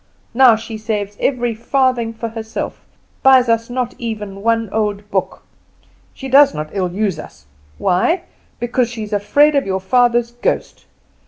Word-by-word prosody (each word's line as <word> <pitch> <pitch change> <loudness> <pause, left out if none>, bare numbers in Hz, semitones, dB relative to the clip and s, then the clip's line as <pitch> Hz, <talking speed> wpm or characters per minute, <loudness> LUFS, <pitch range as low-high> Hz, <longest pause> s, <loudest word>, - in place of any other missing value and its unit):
Now 245 -2 +6
she 220 0 -7
saves 210 -2 -3
every 245 -3 0
farthing 245 0 0
for 230 0 -5
herself, 225 0 -6 0.4
buys 260 -2 +6
us 230 0 +1
not 245 -1 -2
even 210 -4 -5
one 230 +1 +1
old 210 -1 -2
book. 190 -1 -2 0.7
She 270 - -8
does 280 +2 +5
not 155 0 -5
ill 185 -3 -1
use 195 -3 -1
us 70 - -12 0.3
why? 185 - +1 0.4
Because 240 0 0
she 230 -2 -6
is 210 0 -7
afraid 285 +9 +3
of 280 -5 +1
your 190 0 -1
father's 240 +3 +2
ghost. 240 - -3
230 Hz, 155 wpm, -18 LUFS, 205-245 Hz, 0.7 s, Now